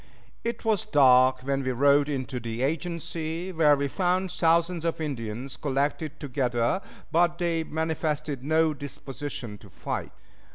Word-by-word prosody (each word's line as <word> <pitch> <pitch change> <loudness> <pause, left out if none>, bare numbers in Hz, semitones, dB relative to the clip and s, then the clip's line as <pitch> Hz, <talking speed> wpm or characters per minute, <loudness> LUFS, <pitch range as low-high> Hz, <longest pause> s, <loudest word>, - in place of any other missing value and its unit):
It 235 -1 -3
was 220 -3 +2
dark 130 -8 +5
when 135 +1 -1
we 130 -1 -1
rode 140 +3 +4
into 130 -3 -3
the 115 +1 -4
agency, 165 +3 -3
where 155 -4 +5
we 140 0 -1
found 185 +4 0
thousands 170 -1 +2
of 165 -1 -1
Indians 125 -4 -4
collected 145 +3 -1
together; 125 +2 0 0.3
but 170 +1 +3
they 170 -2 0
manifested 155 -3 -2
no 155 +2 +3
disposition 135 -5 -7
to 100 - -15
fight. - - -4
150 Hz, 135 wpm, -27 LUFS, 130-165 Hz, 0.3 s, dark